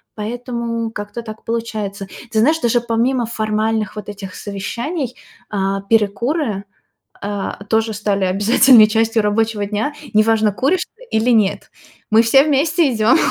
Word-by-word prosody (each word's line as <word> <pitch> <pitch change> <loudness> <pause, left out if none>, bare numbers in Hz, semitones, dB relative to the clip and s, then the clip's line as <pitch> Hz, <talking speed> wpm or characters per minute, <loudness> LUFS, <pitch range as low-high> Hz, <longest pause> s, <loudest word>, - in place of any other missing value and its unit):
поэтому 230 0 -4
как-то 210 +2 -6
так 220 -1 -9
получается. 215 -4 -4 0.2
Ты 220 - +1
знаешь, 310 +8 +3
даже 240 -2 +1
помимо 240 +2 0
формальных 215 -1 -1
вот 210 - -7
этих 195 -2 -8
совещаний, 240 - -4 0.3
а, 195 -1 -1
перекуры, 215 - 0 0.6
а, 200 -1 -4
тоже 220 0 +1
стали 200 -2 -1
обязательной 215 +5 +6
частью 225 0 +1
рабочего 210 0 0
дня. 215 +8 -2 0.2
Неважно, 215 0 +3
куришь 275 - 0
ты - - -16
или 220 +3 +1
нет, 215 -4 +1 0.4
мы 220 +1 +6
все 270 +4 +5
вместе 310 +1 +2
идём 220 +2 +4
225 Hz, 135 wpm, -18 LUFS, 210-240 Hz, 0.6 s, обязательной